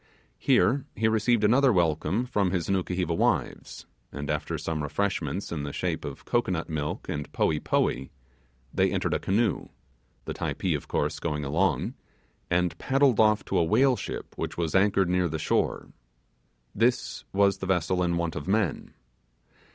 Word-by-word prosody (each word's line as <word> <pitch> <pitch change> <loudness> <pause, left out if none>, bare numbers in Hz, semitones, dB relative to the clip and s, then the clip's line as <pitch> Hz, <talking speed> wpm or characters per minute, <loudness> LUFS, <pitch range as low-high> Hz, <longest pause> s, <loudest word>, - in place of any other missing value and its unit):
Here 135 +2 +3
he 110 +2 +1
received 110 +1 +2
another 130 +5 +5
welcome 90 +5 +1
from 105 -6 +1
his 90 -2 -1
Nukuheva 90 -3 0
wives, - - -1 0.3
and 70 0 -4
after 75 +2 -2
some 80 0 -3
refreshments 85 +2 -2
in 80 -3 -3
the 70 0 -4
shape - - -2
of 70 - -7
cocoanut 95 -9 0
milk 75 -2 -4
and 75 0 -4
poee 75 -2 +1
poee, 65 -2 0 0.6
they - - +3
entered - - 0
a - - +1
canoe 105 +2 0 0.6
(the - - -4
Typee - - -2
of - - -6
course - - -1
going 75 -3 -2
along) 70 - 0 0.6
and 90 0 +1
paddled 135 -3 +3
off 105 -1 +4
to 95 - 0
a - - +4
whaleship 125 +9 +1
which - - -4
was 85 -2 -1
anchored 95 -1 +3
near 90 -1 +1
the 80 - -3
shore. 75 - -1 0.8
This 120 +4 0
was 100 0 +3
the 95 - -4
vessel 90 0 +1
in 85 -1 +1
want 85 -1 -2
of 70 - -5
men. 100 -5 -1
90 Hz, 160 wpm, -27 LUFS, 80-105 Hz, 0.8 s, another